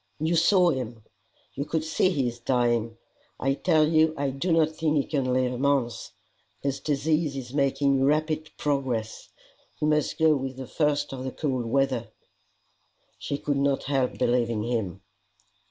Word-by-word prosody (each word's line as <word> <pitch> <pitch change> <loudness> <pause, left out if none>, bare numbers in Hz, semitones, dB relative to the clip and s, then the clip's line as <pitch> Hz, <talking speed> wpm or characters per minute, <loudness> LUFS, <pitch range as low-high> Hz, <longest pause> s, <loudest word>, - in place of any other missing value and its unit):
"You 160 +3 +1
saw 175 +1 +4
him; 120 -5 -5 0.5
you 140 - -3
could 155 +1 -2
see 160 +3 +1
he 140 -9 0
is 120 0 -5
dying. 120 -2 0 0.4
I 135 +1 +1
tell 155 +2 +3
you 160 0 +3
I 140 -1 -1
do 135 +7 -2
not 160 -1 +3
think 155 -1 0
he 140 - +2
can 135 -4 -1
live 125 0 +1
a 125 - -5
month. 135 -4 0 0.5
His 140 -1 -1
disease 150 +1 0
is 125 -1 -7
making 140 -1 +2
rapid 155 +2 +1
progress. 130 -6 -2 0.5
He - - 0
must 150 -1 +1
go 160 -2 +4
with 135 -1 -4
the 135 - -6
first 145 0 0
of 130 -1 -5
the 130 - -4
cold 130 -4 -2
weather." 130 -2 0 1.1
She 140 - -3
could 145 -1 -1
not 140 0 +1
help 135 -2 0
believing 120 -3 +1
him. 110 -7 -3
140 Hz, 165 wpm, -26 LUFS, 125-155 Hz, 1.1 s, saw